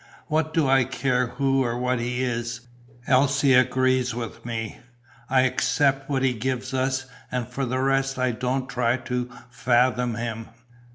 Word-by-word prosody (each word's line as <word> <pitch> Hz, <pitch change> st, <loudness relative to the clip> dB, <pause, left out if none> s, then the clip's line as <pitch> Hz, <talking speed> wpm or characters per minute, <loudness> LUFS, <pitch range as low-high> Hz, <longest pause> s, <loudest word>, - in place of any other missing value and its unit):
What 155 Hz, 0 st, +1 dB
do 160 Hz, -3 st, +2 dB
I 135 Hz, -1 st, +4 dB
care 125 Hz, 0 st, 0 dB
who 135 Hz, +1 st, +1 dB
or 120 Hz, -1 st, -2 dB
what 125 Hz, 0 st, 0 dB
he 125 Hz, +2 st, -2 dB
is! 115 Hz, -1 st, -3 dB, 0.4 s
Else 135 Hz, +2 st, +3 dB
agrees 130 Hz, -1 st, +3 dB
with 120 Hz, -2 st, -6 dB
me. 115 Hz, -2 st, -5 dB, 0.5 s
I 130 Hz, 0 st, +4 dB
accept 135 Hz, +1 st, +1 dB
what 135 Hz, -2 st, 0 dB
he 130 Hz, -1 st, +3 dB
gives 130 Hz, +2 st, -3 dB
us 130 Hz, 0 st, 0 dB, 0.3 s
and 125 Hz, -2 st, -2 dB
for 135 Hz, -1 st, -3 dB
the 130 Hz, +2 st, -1 dB
rest 135 Hz, 0 st, +1 dB
I 130 Hz, -1 st, +1 dB
don't 125 Hz, +3 st, -2 dB
try 125 Hz, -1 st, +1 dB
to 125 Hz, -1 st, -3 dB, 0.2 s
fathom 125 Hz, -1 st, +2 dB
him." 115 Hz, -1 st, -4 dB
130 Hz, 160 wpm, -24 LUFS, 120-135 Hz, 0.5 s, I